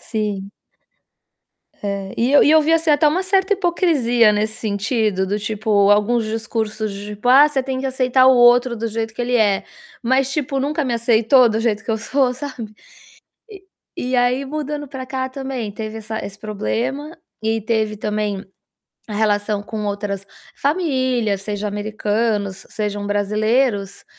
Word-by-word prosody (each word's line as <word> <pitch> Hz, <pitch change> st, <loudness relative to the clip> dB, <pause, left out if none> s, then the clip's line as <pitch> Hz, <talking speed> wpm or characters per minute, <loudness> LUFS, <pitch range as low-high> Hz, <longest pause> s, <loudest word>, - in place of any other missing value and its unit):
Sim. 205 Hz, -3 st, -3 dB, 1.4 s
É, 200 Hz, -1 st, -4 dB
e 240 Hz, +3 st, +2 dB
eu 285 Hz, -, +6 dB
e -, -, +4 dB
eu 315 Hz, 0 st, +6 dB
vi 320 Hz, -, +1 dB
assim 330 Hz, -1 st, +2 dB
até 300 Hz, +1 st, +4 dB
uma 345 Hz, +6 st, 0 dB
certa 385 Hz, +1 st, +2 dB
hipocrisia 315 Hz, -, +2 dB
nesse 215 Hz, +1 st, -1 dB
sentido 210 Hz, -2 st, 0 dB
do 205 Hz, +2 st, -1 dB
tipo 205 Hz, -1 st, +1 dB
alguns 215 Hz, +3 st, +3 dB
discursos 220 Hz, -1 st, -3 dB
de 200 Hz, +1 st, -8 dB
tipo: 210 Hz, +4 st, -4 dB
"Ah, 280 Hz, +4 st, +7 dB
você 270 Hz, -3 st, -1 dB
tem 260 Hz, 0 st, -3 dB
que 270 Hz, -, -2 dB
aceitar 255 Hz, 0 st, +3 dB
o 260 Hz, -, +7 dB
outro 240 Hz, 0 st, +5 dB
do 230 Hz, -, -3 dB
jeito 225 Hz, 0 st, -4 dB
que 245 Hz, -, -3 dB
ele 245 Hz, +1 st, +1 dB
é", 205 Hz, -4 st, +2 dB, 0.4 s
mas, 260 Hz, +2 st, +1 dB
tipo, 275 Hz, -2 st, -1 dB
nunca 295 Hz, +2 st, -1 dB
me 250 Hz, -, -1 dB
aceitou 235 Hz, +2 st, +4 dB
do 220 Hz, -, -1 dB
jeito 220 Hz, -2 st, 0 dB
que -, -, -3 dB
eu 220 Hz, -, +1 dB
sou, 255 Hz, +2 st, +1 dB
sabe? 250 Hz, -6 st, -7 dB, 1.2 s
E 250 Hz, -, -3 dB
e -, -, +2 dB
aí, 250 Hz, +2 st, +2 dB
mudando 295 Hz, 0 st, -4 dB
para 260 Hz, -1 st, -6 dB
cá 260 Hz, 0 st, -3 dB
também, 260 Hz, -5 st, -5 dB
teve 220 Hz, +1 st, -6 dB
essa 220 Hz, 0 st, -5 dB
esse 200 Hz, +1 st, -8 dB
problema, 245 Hz, +9 st, -3 dB, 0.3 s
e 220 Hz, +1 st, 0 dB
teve 220 Hz, -1 st, -1 dB
também 210 Hz, -1 st, -2 dB, 0.6 s
a 210 Hz, -, -5 dB
relação 205 Hz, -1 st, 0 dB
com 210 Hz, 0 st, -5 dB
outras 200 Hz, -1 st, -4 dB, 0.3 s
famílias, 260 Hz, -, 0 dB
seja 205 Hz, +1 st, -4 dB
americanos, 210 Hz, -1 st, -2 dB
sejam 205 Hz, -1 st, -3 dB
brasileiros, 210 Hz, +1 st, 0 dB
225 Hz, 165 wpm, -20 LUFS, 210-265 Hz, 1.4 s, Ah